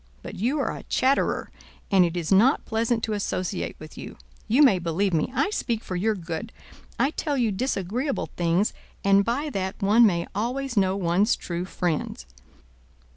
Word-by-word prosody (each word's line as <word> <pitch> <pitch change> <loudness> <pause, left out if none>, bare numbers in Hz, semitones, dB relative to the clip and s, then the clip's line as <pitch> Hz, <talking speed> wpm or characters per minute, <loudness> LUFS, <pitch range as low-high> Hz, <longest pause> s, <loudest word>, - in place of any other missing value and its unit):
But - - -7
you 255 +9 -1
are 275 - -1
a - - -8
chatterer, 265 +2 +1 0.4
and 190 -2 +6
it 175 0 -1
is 170 0 -3
not 230 +9 +4
pleasant 225 +1 0
to 220 - -1
associate 185 -2 -2
with 155 0 -11
you. - - -9 0.3
You 250 +7 +5
may 215 -10 +5
believe 175 +3 0
me, 160 +8 +1
I 275 - +1
speak 230 - -2
for 185 - -5
your 215 +5 +1
good. 170 +3 -5 0.5
I 275 - +2
tell 295 -3 -2
you 235 -4 +2
disagreeable 245 - -2
things, 175 +4 +1 0.3
and 195 0 +5
by 275 +8 -1
that 190 -3 -3
one 220 +3 +5
may 170 -3 0
always 250 +4 -2
know 190 -2 +2
one's 195 +4 +2
true 175 0 -4
friends! 165 - -3
205 Hz, 175 wpm, -25 LUFS, 180-240 Hz, 0.5 s, and